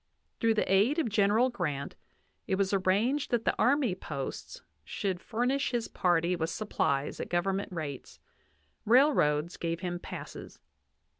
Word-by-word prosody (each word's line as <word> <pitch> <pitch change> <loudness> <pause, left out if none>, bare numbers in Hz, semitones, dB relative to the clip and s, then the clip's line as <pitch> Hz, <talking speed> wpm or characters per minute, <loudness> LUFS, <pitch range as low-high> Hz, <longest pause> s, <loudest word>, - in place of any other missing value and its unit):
Through 225 -1 +3
the 210 - 0
aid 220 - +4
of 315 -8 +1
General 215 +4 +3
Grant, 150 - -3 0.5
it 190 - +1
was 195 0 0
arranged 205 +9 +1
that 235 -2 0
the - - +2
army 270 -5 +3
posts 145 -6 -6 0.2
should 190 -3 -3
f - - -24
urnish 250 +5 +1
his 240 -3 -2
party 175 -1 +1
with 160 -1 -2
supplies 145 -9 -1
at - - -4
government 195 +3 -1
rates; 150 -6 -6 0.6
railroads 185 - +3
gave 170 0 -3
him 175 -1 -3
passes. - - -8
195 Hz, 145 wpm, -30 LUFS, 170-235 Hz, 0.6 s, aid